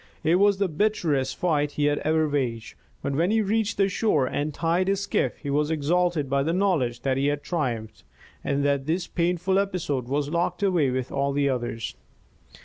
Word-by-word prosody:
It 165 +3 +4
was 200 0 +4
the 200 0 +1
bitterest 155 -7 0
fight 150 -4 0
he 145 - 0
had 145 0 +2
ever 155 0 +1
waged; 125 -6 -2 0.3
but 140 - -1
when 165 +6 +1
he 220 +1 +2
reached 215 +1 0
the 195 - +3
shore 185 - +1
and 145 +4 -2
tied 170 +4 0
his 195 0 +1
skiff, - - -1
he 145 - -5
was 150 +1 +1
exalted 160 0 +1
by 140 +1 +1
the 160 +4 0
knowledge 160 -12 +1
that 130 0 0
he 140 +1 +1
had 145 0 -1
triumphed, 115 - -3 0.4
that 140 0 0
this 170 +3 0
painful 180 +2 0
episode 170 -10 -2
was 140 +2 -1
locked 175 +3 -1
away 175 -8 +2
with 130 0 -3
all 140 0 0
the 140 0 +1
others. 120 -4 -3
150 Hz, 190 wpm, -25 LUFS, 140-180 Hz, 0.4 s, It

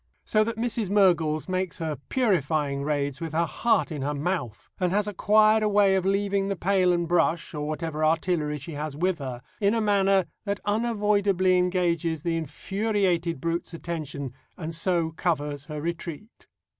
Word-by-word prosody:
So 215 0 +3
that 230 0 -3
Mrs. 230 -3 -1
Mergles 170 -6 +3
makes 185 -1 -2
her 160 -2 -2
purifying 155 - +1
raids 145 -1 -1
with 165 -2 -4
her 170 +2 +2
heart 225 +3 +1
in 150 -3 -4
her 145 +2 -1
mouth, 145 - -3
and 180 -2 +1
has 205 +1 +1
acquired 215 +2 +4
a 215 - +2
way 200 -1 +4
of 190 -1 +1
leaving 195 0 +1
the 195 - -1
pail 185 0 +2
and 170 -1 0
brush, 170 0 +1
or 150 -1 -3
whatever 155 0 -3
artillery 155 -1 +1
she 145 +4 -8
has 150 -1 -4
with 180 +2 0
her, 125 -3 -6 0.2
in 205 +1 +2
a - - +1
manner 195 -3 +3 0.2
that 200 -1 -2
unavoidably 205 -4 +2
engages 175 -3 +1
the 170 -1 0
infuriated 180 0 -1
brute's 170 +2 -3
attention 150 -6 -5 0.2
and 165 -1 -5
so 165 -1 0
covers 150 -4 -2
her 150 0 -6
retreat. 170 +6 -6
175 Hz, 170 wpm, -26 LUFS, 155-200 Hz, 0.2 s, acquired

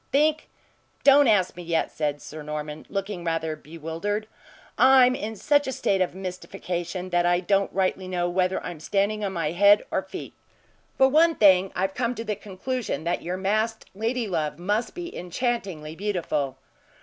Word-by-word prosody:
"Think? 305 +2 +2 0.5
Don't 280 0 +7
ask 200 -5 +3
me 175 - -8
yet." 170 -1 -1
said 145 -2 -2
Sir 155 0 -8
Norman, 150 0 -6
looking 195 -2 -4
rather 165 -2 -1
bewildered. 165 +8 -4 0.5
"I'm 260 -1 +6
in 220 -3 -4
such 290 +6 +2
a - - -1
state 195 -6 0
of 180 -1 0
mystification 180 -1 -5
that 175 0 +3
I 175 0 +3
don't 195 +2 +1
rightly 190 -1 0
know 175 -1 -1
whether 185 +1 +1
I'm 175 -3 -6
standing 200 +5 0
on 195 -1 -2
my 165 -4 -1
head 200 +4 +5
or - - +1
feet. - - -8 0.6
For 265 - +6
one 320 +4 +4
thing, 190 -2 +5
I 180 - -2
have 190 0 0
come 245 +1 -1
to 225 - -5
the 215 -2 -2
conclusion 205 - -4
that 170 +1 -1
your 180 +2 -3
masked 215 +4 -1
ladylove 205 -9 -1
must 205 +7 -1
be 350 0 -6
enchantingly 180 -6 -3
beautiful." 170 -8 -2
190 Hz, 170 wpm, -25 LUFS, 170-220 Hz, 0.6 s, Don't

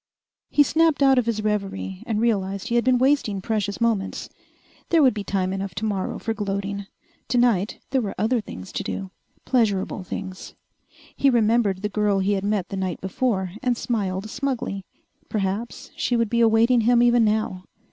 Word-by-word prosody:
He 290 - +5
snapped 315 0 +2
out 270 -2 +5
of 240 - -1
his 215 -2 -1
reverie 195 - -2
and 215 -2 0
realized 200 -4 0
he - - -2
had 240 0 +3
been 255 0 +3
wasting 260 -6 +2
precious 205 0 -2
moments. 225 -5 -1 0.6
There 330 -3 +5
would 260 - +5
be 205 -1 -4
time 190 -1 -1
enough 195 -2 -4
tomorrow 200 -2 -2
for 225 - -2
gloating. 200 -1 -3 0.4
Tonight, 230 -4 +2
there 265 -1 +2
were 205 -4 -4
other 230 +2 +1
things 95 - -9
to - - -3
do. 195 -1 -5 0.3
Pleasurable 205 -5 +1
things. 190 0 -7 0.6
He 275 - +3
remembered 220 -5 +2
the - - +1
girl 210 -1 +1
he 195 +1 +1
had 195 -1 -1
met 200 -3 -1
the 195 - -4
night 185 -2 -2
before, 190 -1 -1
and 250 -2 +1
smiled 200 -5 -2
smugly. 245 -6 -3 0.5
Perhaps 205 +3 -3
she 245 - 0
would 230 -2 +1
be 235 0 +2
awaiting 230 +2 +4
him 240 +1 +4
even 240 -1 +5
now. 210 -4 0
215 Hz, 175 wpm, -24 LUFS, 195-240 Hz, 0.6 s, He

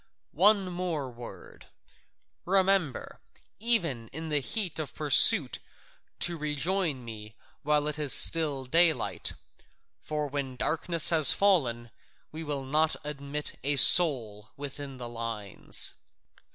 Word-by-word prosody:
One 200 +4 +2
more 170 -7 -5
word 120 0 -14 0.8
remember, 190 - -1 0.4
even 170 - -1
in 160 +6 -9
the 150 -1 -1
heat 180 - -4
of 155 - -7
pursuit 150 -3 +5 0.6
to 175 -1 0
rejoin 150 -1 -3
me 110 -1 -11 0.3
while 150 0 -1
it 150 0 -5
is 145 -3 0
still 145 -4 +4
daylight, 165 +4 0 0.7
for 150 -1 -5
when 140 -2 -6
darkness 165 +4 +1
has 155 -5 +8
fallen 125 - -1 0.4
we 160 +1 -9
will 145 -3 -6
not 155 +3 0
admit 145 0 -5
a 145 +1 0
soul 120 -11 +4
within 140 -1 -9
the 120 -1 -8
lines." 115 -4 -3
150 Hz, 115 wpm, -27 LUFS, 130-165 Hz, 0.8 s, has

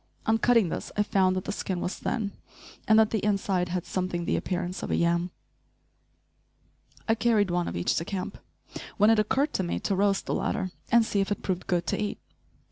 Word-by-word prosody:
On 225 0 +2
cutting 230 -7 +4
this - - -5
I 210 - +4
found 190 -2 +2
that 185 - -3
the - - -2
skin 190 -3 -3
was 180 - -3
thin, 210 -4 -2 0.6
and 220 - +6
that 220 0 +5
the 220 - -1
inside 195 -3 0
had 180 0 -2
something 180 -2 -2
the - - +1
appearance 180 0 -3
of - - -4
a - - +1
yam. 170 +1 +1 1.8
I 225 - +4
carried 215 -4 +2
one 175 0 0
of - - -4
each 85 - +1
to - - 0
camp, 185 +1 -5 0.6
when 210 +2 +6
it 225 - +4
occurred 275 +8 +1
to - - 0
me 175 - -2
to 200 - 0
roast 195 0 +1
the - - -2
latter, 185 -2 -1 0.2
and 235 -1 +5
see 205 - 0
if 195 - -2
it 205 - -2
proved 185 -2 -2
good 175 -2 0
to - - -1
eat. 210 0 -2
195 Hz, 210 wpm, -27 LUFS, 180-215 Hz, 1.8 s, and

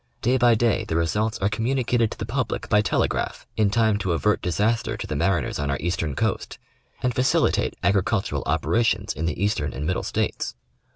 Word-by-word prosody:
Day 125 +3 +3
by 120 -1 +5
day 115 0 +2
the 80 - -3
re 85 0 +2
sults 105 +7 -1
are 100 - +3
communicated 120 0 +1
to - - -8
the 110 - -4
public 125 +3 -2
by 105 -1 +5
telegraph 105 - -1
in 105 -2 +3
time 110 -1 +2
to 95 -4 0
avert 105 +6 +1
disaster 105 +6 0
to - - -5
the 75 - -4
mariners 85 +1 0
on 70 -1 -1
our 70 - 0
eastern 80 -4 -2
coast, - - -2 0.5
and 125 -1 +1
facilitate 125 +2 +2
agri 100 -1 +3
cultural 100 +1 -1
operations 110 -2 +1
in 80 +3 -3
the 90 - -3
Eastern 75 -9 0
and 70 +3 -4
Middle 90 +3 0
States. - - -2
105 Hz, 195 wpm, -24 LUFS, 85-115 Hz, 0.5 s, by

